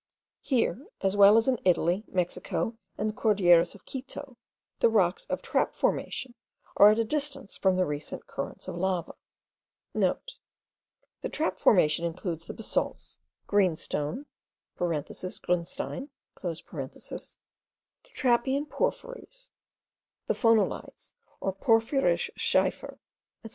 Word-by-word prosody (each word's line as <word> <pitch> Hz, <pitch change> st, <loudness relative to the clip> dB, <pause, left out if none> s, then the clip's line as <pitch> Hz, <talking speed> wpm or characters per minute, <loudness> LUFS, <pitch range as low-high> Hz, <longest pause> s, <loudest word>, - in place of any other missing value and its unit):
Here, 260 Hz, -, 0 dB
as 195 Hz, +1 st, +1 dB
well 205 Hz, +1 st, +8 dB
as 225 Hz, -, +3 dB
in 255 Hz, -3 st, +2 dB
Italy, 180 Hz, +2 st, +2 dB
Mexico, 185 Hz, +5 st, -2 dB, 0.2 s
and 215 Hz, -, -1 dB
the 215 Hz, -, -2 dB
Cordilleras 180 Hz, -6 st, +4 dB
of 200 Hz, -, -16 dB
Quito, 265 Hz, 0 st, -7 dB, 0.4 s
the 235 Hz, -, +5 dB
rocks 195 Hz, -5 st, +2 dB
of -, -, -3 dB
trap -, -, 0 dB
formation* 255 Hz, -2 st, -1 dB, 0.4 s
are 205 Hz, -, +9 dB
at 215 Hz, -, +3 dB
a 230 Hz, -, +3 dB
distance 275 Hz, -2 st, -3 dB
from 190 Hz, -1 st, +2 dB
the 185 Hz, 0 st, +2 dB
recent 150 Hz, -1 st, -5 dB
currents -, -, -6 dB
of -, -, -5 dB
lava 185 Hz, -1 st, -1 dB, 0.5 s
(* -, -, -61 dB
The -, -, +2 dB, 1.1 s
trap 190 Hz, -12 st, -1 dB
formation 160 Hz, -4 st, +4 dB
includes 170 Hz, -1 st, -4 dB
the -, -, -5 dB
basalts, -, -, -3 dB, 0.3 s
green 195 Hz, -5 st, +3 dB
stone 150 Hz, -, -3 dB, 0.5 s
(grunstein), 180 Hz, -, -3 dB, 0.3 s
the 170 Hz, -3 st, -3 dB, 1.5 s
trappean 265 Hz, +3 st, +1 dB
porphyries, -, -, -4 dB, 0.7 s
the -, -, +1 dB
phonolites 225 Hz, -3 st, +1 dB, 0.3 s
or 195 Hz, -, -1 dB
porphyrschiefer, 225 Hz, -, +1 dB
etc.) -, -, -48 dB
205 Hz, 115 wpm, -28 LUFS, 175-255 Hz, 1.5 s, are